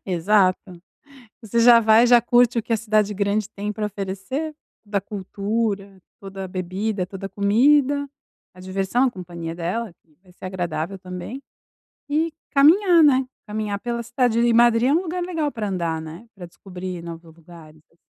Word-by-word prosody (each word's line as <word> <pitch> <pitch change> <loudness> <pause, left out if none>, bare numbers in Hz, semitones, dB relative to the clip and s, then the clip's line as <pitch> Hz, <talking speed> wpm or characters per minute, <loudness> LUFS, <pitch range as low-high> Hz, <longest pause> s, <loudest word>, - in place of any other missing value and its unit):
Exato. 185 0 +1 0.6
Você 225 +2 -1
já 235 0 +7
vai, 225 +2 +5
já 240 -1 +6
curte 240 0 +3
o - - -6
que 230 - -2
a - - +2
cidade 215 -1 +1
grande 200 +1 -1
tem 205 0 -5
pra 210 0 -3
oferecer. 205 +10 -4 0.3
Da 200 -2 -1
cultura, 200 0 -3 0.2
toda 195 0 -7
a - - -5
bebida, 185 +2 -3
toda 195 0 -8
a 195 - -5
comida, 275 +8 +2 0.5
a 180 - -17
diversão, 195 +6 -1
a 255 - 0
companhia 170 -4 -7
dela 185 +6 -3
que 155 -2 -32
vai 185 -2 -21
ser 185 - -12
agradável 180 0 -4
também, 185 +8 -7 0.7
e 315 +2 0 0.2
caminhar, 335 +5 +5
né, 265 -2 +4 0.2
caminhar 210 -1 -3
pela 235 +2 -4
cidade, 240 -1 0
e 240 0 +3
Madrid 235 +1 +4
é 280 - +3
um 335 - +2
lugar 360 0 -4
legal 325 -5 -2
pra 215 -4 -4
andar, 170 -4 -2
né, 165 +8 -10
para 180 -3 -10
descobrir 180 0 -8
novos 165 -1 -10
lugares 160 -2 -15
assim. 165 - -32
205 Hz, 170 wpm, -22 LUFS, 185-240 Hz, 0.7 s, já